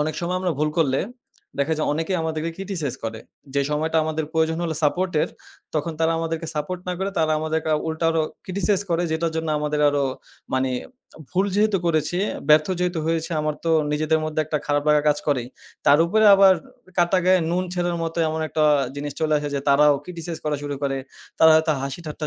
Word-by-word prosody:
অনেক 150 +1 -1
সময় 180 +1 -1
আমরা 185 -2 0
ভুল 150 0 +2
করলে 135 -4 +2 0.6
দেখা 140 +3 +1
যায় 155 - -1
অনেকেই 165 +5 -1
আমাদেরকে 160 0 -2
ক্রিটিসাইজ 180 -9 -3
করে। 110 0 -4 0.4
যে 140 - +3
সময়টা 155 +2 0
আমাদের 155 0 -2
প্রয়োজন 160 0 +1
হল 165 - -1
সাপোর্ট 180 +5 +1
এর - - -1 0.5
তখন 155 +2 -1
তারা 165 0 +3
আমাদেরকে 165 0 -3
সাপোর্ট 165 +4 -3
না - - 0
করে 195 +1 -1
তারা 155 -1 +2
আমাদেরকে 160 0 -2 0.2
উল্টা 160 +1 -1
আরো 165 -1 +1 0.2
ক্রিটিসাইজ 195 +1 0
করে 170 +1 +1
যেটার 160 0 -1
জন্য 160 0 -2
আমাদের 150 0 -1
আরো 145 -1 +1 0.5
মানি 130 0 +1 0.6
ভুল 190 +2 +1
যেহেতু 210 -1 +3
করেছি 160 +1 +1 0.3
ব্যর্থ 150 0 +6
যেহেতু 180 -1 0
হয়েছে 165 +1 -1
আমার 150 0 -1
তো 165 - +1 0.2
নিজেদের 155 +1 +1
মধ্যে 155 0 -1
একটা 150 0 -2
খারাপ 145 0 +1
লাগা 150 -1 +4
কাজ 145 0 +2
করেই। 125 -4 0 0.4
তার 145 - +7
উপরে 220 +5 +3
আবার 195 -1 +7 0.4
কাটা 175 +2 +3
গায়ে 185 0 +5
নুন 180 +2 0
ছিটানোর 175 -1 -1
মতো 165 +1 -3
এমন 160 0 -2
একটা 155 0 +1 0.3
জিনিস 145 0 -4
চলে 155 -1 +1
আসে 145 0 -4
যে, 140 - -1
তারাও 145 +1 +5
ক্রিটিসাইজ 170 -2 -6
করা 150 -1 0
শুরু 145 0 -3
করে। 135 -1 0 0.4
তারা 160 - +7
হয়তো 160 0 +3
হাসি 135 +4 -4
ঠাট্টা 155 0 -4
160 Hz, 195 wpm, -23 LUFS, 150-170 Hz, 0.6 s, তার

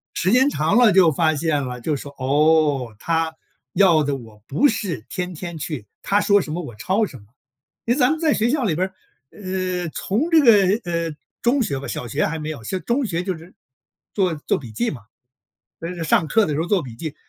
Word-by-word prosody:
时 185 - +1
间 260 +4 +5
长 160 - +1
了 240 -3 +6
就 180 -4 +6
发 155 +2 +1
现 150 -1 0
了 125 -1 -6
就 150 +5 -1
说， 140 0 -8
哦， 145 -3 +2
他 165 -1 -1 0.4
要 170 -6 +5
的 140 -1 -1
我 110 -5 -11
不 240 - +3
是 200 - -3
天 180 -1 -4
天 170 0 -7
去 150 -7 -5 0.2
他 205 +1 +1
说 205 0 +4
什 155 - -6
么 175 - -3
我 120 -7 -9
抄 190 - 0
什 145 - -10
么。 105 - -17 0.6
因 235 - +2
为 285 - -3
咱 250 - +5
们 315 - -1
在 315 -3 +2
学 225 +2 +1
校 285 -1 0
里 185 -9 +1
边， 185 +3 -1 0.4
呃， 185 -3 -3
从 215 - -1
这 325 - +7
个 210 -4 +5
呃， 170 -1 -2 0.3
中 255 +3 +2
学 140 -10 -2
吧， 140 - -7
小 125 - -5
学 140 +7 0
还 160 - -3
没 155 0 -5
有， 145 -7 -7
现 185 - -3
中 255 +3 +1
学 175 -4 -2
就 185 -3 -3
是 170 +3 -15 0.6
做 185 -4 +1
做 150 - -1
笔 120 -6 -9
记 115 +3 -1
嘛， 125 - -8 0.8
就 165 - -4
是 175 -2 -5
上 160 +1 +2
课 220 +6 +3
的 155 - -2
时 150 - 0
候 - - -1
做 195 -1 +2
笔 120 -4 -9
记 155 +4 -6
170 Hz, 245 characters per minute, -22 LUFS, 150-200 Hz, 0.8 s, 这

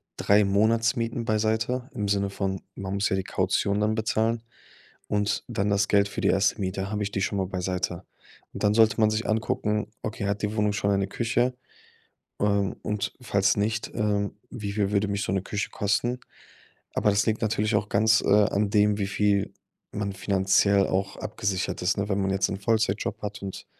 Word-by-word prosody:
3 100 +1 +4
Monatsmieten 115 +3 +1
beiseite, 110 +4 0
im 105 -4 -2
Sinne 100 0 +1
von, 95 -1 -3
man 95 0 -5
muss 100 +1 +1
ja - - +1
die 95 - -1
Kaution 100 +1 0
dann 105 +1 +1
bezahlen. 110 +1 0 0.6
Und 105 0 0
dann 105 -4 -1
das 100 0 +2
Geld 100 0 +3
für - - -5
die - - +2
1. 100 +2 +2
Miete, 95 +1 -3
habe 105 -1 -2
ich 100 - -2
die 95 - -2
schon 100 +1 -1
mal 95 - -1
beiseite? 90 -1 -3 0.5
Und - - -7
dann 105 0 +4
sollte 110 -1 +4
man 110 - +5
sich 110 +1 -1
angucken: 105 -1 0 0.2
„Okay, 110 -1 -3
hat 100 +1 -1
die 105 +1 -1
Wohnung 105 -1 +1
schon 100 -1 0
eine 100 -1 +1
Küche? 120 +4 0 0.9
Ähm, 100 -1 +1
und 105 0 -2
falls 100 -3 +2
nicht, 110 +2 -1
ähm, 105 -2 0 0.2
wie 105 -5 -4
viel 100 -2 0
würde 100 0 +2
mich 100 0 -1
so - - -2
'ne 95 - +1
Küche 100 -1 -3
kosten?“ 115 +5 0 0.7
Aber 105 - +2
das 100 +1 +2
liegt 110 -1 0
natürlich 110 0 +1
auch 100 0 0
ganz, 110 +2 +4
äh, - - -3
an 105 0 +3
dem, 105 -1 +3
wie 100 - 0
viel 100 -1 +1 0.4
man 100 -1 -3
finanziell 95 0 +2
auch 95 +1 -1
abgesichert 100 -4 -2
ist, 90 +2 +1
ne? 100 +1 -1
Wenn 100 0 +1
man 95 - 0
jetzt 95 0 +1
'n 100 - -3
Vollzeitjob 110 -1 0
hat 105 0 -5
und 95 - -6
105 Hz, 195 wpm, -26 LUFS, 100-110 Hz, 0.9 s, man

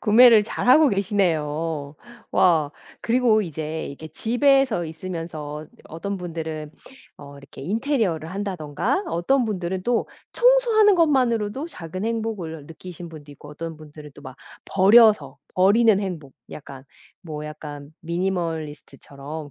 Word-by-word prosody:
구매를 230 0 +7
잘 215 - -4
하고 295 +4 +7
계시네요. 165 - -1 0.4
와. 160 -5 +3 0.3
그리고 230 -2 +3
이제 160 -2 -5
이렇게 155 +3 -9
집에서 245 - +2
있으면서 160 -3 -7 0.2
어떤 200 +5 -5
분들은 160 -4 -6 0.5
어 140 0 -12
이렇게 140 -1 -13
인테리어를 200 - -1
한다든가 190 - -2
어떤 245 +10 +1
분들은 190 -3 -3
또 240 +3 0 0.2
청소하는 475 -4 +4
것만으로도 265 - +1
작은 185 - -6
행복을 215 -9 -4
느끼신 170 +1 -10
분도 150 -2 -12
있고 145 +1 -14
어떤 165 +2 -7
분들은 150 -1 -12
또 145 - -14
막 130 - -9 0.3
버려서 195 - +5 0.2
버리는 205 +2 +4
행복 165 -9 -6 0.2
약간 135 -3 -10 0.4
뭐 150 -3 -7
약간 150 -1 -9
미니멀리스트처럼 160 -4 -5
175 Hz, 305 characters per minute, -23 LUFS, 155-220 Hz, 0.5 s, 구매를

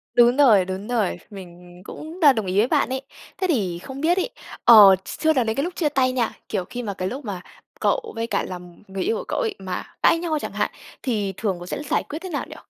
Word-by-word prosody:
Đúng 240 +1 +5
rồi, 225 -10 +6
đúng 190 +2 -5
rồi. 230 -6 0
Mình 180 -3 -12
cũng 320 +4 -9
đ 330 - +2
đồng 220 -3 -2
ý 185 +2 -2
với 220 +4 +4
bạn - - +1
ấy. 265 0 -2 0.4
Thế 375 0 0
thì 195 - 0
không 265 +8 -8
biết 345 +4 +2
ấy, 375 - 0 0.4
ờ, 210 -5 +10
s - - -7
chưa 315 0 +3
nói 255 -5 +1
đến 220 - -1
cái 275 - 0
lúc 355 +1 -4
chia 310 -4 +1
tay 260 -3 +2
nha, 250 -3 0 0.2
kiểu, 190 -4 -2
khi 245 +4 -6
mà 205 -3 -3
cái 185 -1 -3
lúc 260 +6 -6
mà 195 -4 -5 0.4
cậu 485 -2 0
với 230 0 -2
cả - - 0
làm 180 0 -9
người 195 0 -4
yêu 445 +4 0
của - - -5
cậu - - -2
ấy 450 -4 -1
mà 185 -1 -4 0.2
cãi 330 - +5
nhau 330 -2 -1
chẳng - - -5
hạn, - - -1 0.3
thì 210 -7 -1
thường 205 -4 -1
cậu 175 - -8
sẽ 280 - -5
giải - - 0
quyết 305 - -7
thế 375 - -6
nào 300 - -3
nhỉ? - - -9
235 Hz, 265 wpm, -23 LUFS, 190-300 Hz, 0.4 s, ờ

